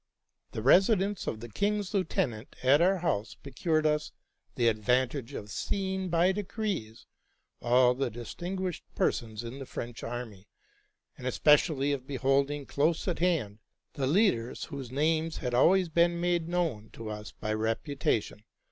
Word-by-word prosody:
The 110 - -4
residence 195 - +4
of 110 - -3
the 120 - -7
king's 205 - -1
lieutenant 130 - -1
at 140 +4 +5
our 190 +2 +4
house 110 - -1
pro 140 - -12
cured 155 +3 +1
us 150 0 +1 0.4
the 120 - +2
advantage 125 +3 0
of 105 0 -7
seeing 190 - -2
by 170 +2 +3
degrees 195 - -4 0.6
all 125 +1 +4
the 135 +2 -1
dis 120 +1 -8
tinguished 185 0 -4
persons 110 -2 -1
in 120 +4 -7
the 135 - -6
French 120 -1 -6
army, 115 -5 -6 0.7
and 130 - -5
especially 145 +1 +3
of 135 -2 -3
beholding 140 +1 +1
close 155 +7 0
at 180 - -1
hand 155 - 0 0.3
the 140 -4 -1
leaders 145 - +2
whose 140 -5 -6
names 160 +4 0
had 125 -1 -3
already 180 +9 +4
been 170 +1 +2
made 175 -1 0
known 165 -12 -1
to 110 -1 -6
us 105 0 -7
by 110 0 -4
reputation. 110 -1 -1
140 Hz, 150 wpm, -29 LUFS, 120-175 Hz, 0.7 s, at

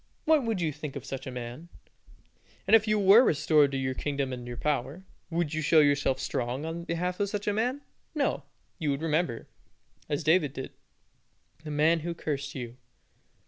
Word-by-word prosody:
What 310 -3 +4
would 225 -5 -1
you 160 -2 0
think 150 -1 -7
of 140 -1 -6
such 135 0 -6
a - - -4
man? 125 +6 -7 1.0
And - - +6
if 220 0 +4
you 215 0 +3
were 205 +4 +7
restored 150 - +3
to 135 - -2
your 130 -1 -1
kingdom 140 -1 -2
and 120 -1 -7
power, 150 +4 -2 0.2
would 165 -2 -1
you 155 - -1
show 155 +1 +5
yourself 145 -3 +3
strong 125 +4 -2
on 165 +1 -5
behalf 180 +2 -2
of 200 -1 0
such 205 0 -4
a 205 - +2
man? 250 +6 -1 0.3
No; 280 - 0 0.4
you 155 - -1
would 140 +2 -1
remember, 155 -6 -1 0.6
as 145 -2 -1
David 155 -4 +3
did, 130 -3 -6 0.9
the 155 - -7
man 155 +3 +3
who 170 +2 -4
cursed 145 -1 -4
you. 120 -2 -6
150 Hz, 185 wpm, -28 LUFS, 135-175 Hz, 1.0 s, were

